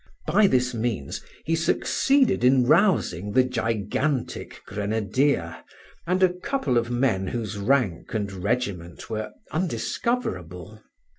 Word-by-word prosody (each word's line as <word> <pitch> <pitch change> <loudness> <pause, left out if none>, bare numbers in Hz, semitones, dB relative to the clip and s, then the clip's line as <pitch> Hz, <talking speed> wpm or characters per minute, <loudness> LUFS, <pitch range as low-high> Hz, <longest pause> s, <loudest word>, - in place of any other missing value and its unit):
By 210 -1 +4
this 125 -5 +1
means 110 - -3 0.2
he 165 - 0
succeeded 250 - +2
in 125 0 +5
rousing 150 - +2
the 130 - +5
gigantic 115 +3 -2
grenadier 110 +7 0 0.5
and 185 +2 +2
a 180 -1 +4
couple 180 - -2
of 120 0 +1
men 120 -6 +1
whose 110 -1 -4
rank 105 -5 +1
and 100 -2 -1
regiment 95 -3 -3
were 110 0 -3 0.2
undiscoverable. 110 - -3
120 Hz, 115 wpm, -25 LUFS, 105-155 Hz, 0.5 s, in